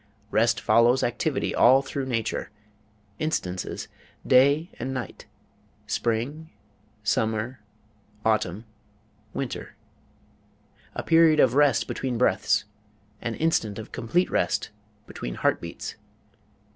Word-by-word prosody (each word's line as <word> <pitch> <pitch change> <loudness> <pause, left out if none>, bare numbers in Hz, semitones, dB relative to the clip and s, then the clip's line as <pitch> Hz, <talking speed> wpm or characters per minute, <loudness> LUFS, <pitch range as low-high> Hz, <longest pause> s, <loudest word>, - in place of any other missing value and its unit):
Rest - - +3
follows 120 +3 +4
activity 120 - -1
all 130 +3 +6
through 135 0 -4
nature. 115 -3 -2 0.7
Instances: 95 - -3 0.4
day 140 +6 +4
and 130 +3 -3
night; 125 -5 -6 0.6
spring 130 +8 -2 0.5
summer 110 +3 0 0.7
autumn 110 -1 0 0.7
winter; 135 +1 -5 1.2
a - - -3
period 165 -2 +5
of 125 -4 +5
rest 145 -3 +3
between 130 -3 -3
breaths; 110 -2 +2 0.6
an 115 -1 -3
instant 115 -10 0
of 110 - -8
complete 130 +10 0
rest 100 +4 0 0.3
between - - -6
heart - - +1
beats. - - -6
120 Hz, 100 wpm, -26 LUFS, 110-140 Hz, 1.2 s, all